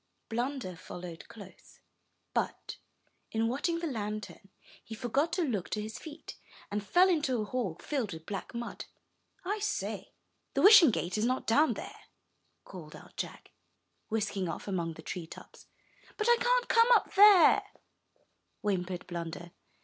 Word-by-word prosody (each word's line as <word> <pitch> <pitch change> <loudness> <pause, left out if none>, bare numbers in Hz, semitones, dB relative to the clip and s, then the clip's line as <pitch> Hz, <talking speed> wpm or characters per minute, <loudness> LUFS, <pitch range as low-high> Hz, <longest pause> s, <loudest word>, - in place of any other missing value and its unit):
Blunder 240 -5 -3
followed 175 -1 -9
close, 200 -4 -14 0.5
but, - - -3 0.5
in 225 0 +1
watching 290 +8 -1
the 335 - -4
lantern, 210 -6 -5 0.3
he 225 - -8
forgot 265 +7 0
to 355 0 +1
look 215 - -2
to 215 - -2
his 215 +1 -6
feet, 310 0 -10 0.3
and 205 0 -2
fell 355 - +5
into 295 -9 +1
a 215 - -1
hole 205 -8 -3
filled 260 -9 -2
with 160 -1 -8
black 200 +4 -6
mud. 235 0 -5 0.6
"I 410 +3 -1
say! 420 +1 -3 0.4
the - - +2
Wishing 400 -7 +9
Gate 195 -2 -2
is 215 - +1
not 255 +2 0
down 295 +8 +3
there," - - -8 0.7
called 160 -5 -10
out - - -14
Jack, - - -6 0.6
whisking 200 -4 -1
off - - -6
among 170 -4 -2
the - - -11
treetops. 170 -3 -9 0.5
"But 425 - -1
I 475 0 +6
can't - - +2
come 460 0 +5
up - - +1
there," 400 -3 +8 1.0
whimpered 185 -3 -2
Blunder. 170 0 -6
225 Hz, 150 wpm, -31 LUFS, 185-310 Hz, 1.0 s, Wishing